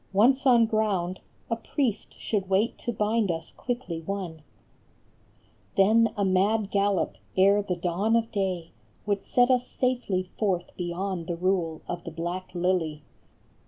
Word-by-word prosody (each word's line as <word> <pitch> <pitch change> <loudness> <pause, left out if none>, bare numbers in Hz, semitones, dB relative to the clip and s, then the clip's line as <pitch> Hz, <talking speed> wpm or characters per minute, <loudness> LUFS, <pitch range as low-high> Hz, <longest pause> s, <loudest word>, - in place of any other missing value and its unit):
Once 260 +7 +4
on 240 -3 +6
ground 200 -5 0 0.3
A - - +3
priest 235 -1 -2
should 195 -4 -2
wait 195 +5 +2
to 240 - -3
bind 215 -1 +1
us 165 -1 -3
quickly 240 -10 -4
one. 175 -3 -5 1.4
Then 220 +3 +5
a 200 - +2
mad 195 +2 +2
gallop, 200 -2 +1 0.2
ere 200 +2 +5
the 185 -3 -2
dawn 180 +6 0
of 230 -1 +1
day, 185 -5 -2 0.3
Would 205 -1 0
set 245 +1 +3
us 250 -1 +2
safely 210 -8 -1
forth 185 -5 -1
beyond 175 0 -3
the 175 - -2
rule 175 -3 0
Of 175 -1 -4
the - - -5
Black 175 +3 -4
Lily. 175 -4 0
195 Hz, 145 wpm, -27 LUFS, 175-220 Hz, 1.4 s, on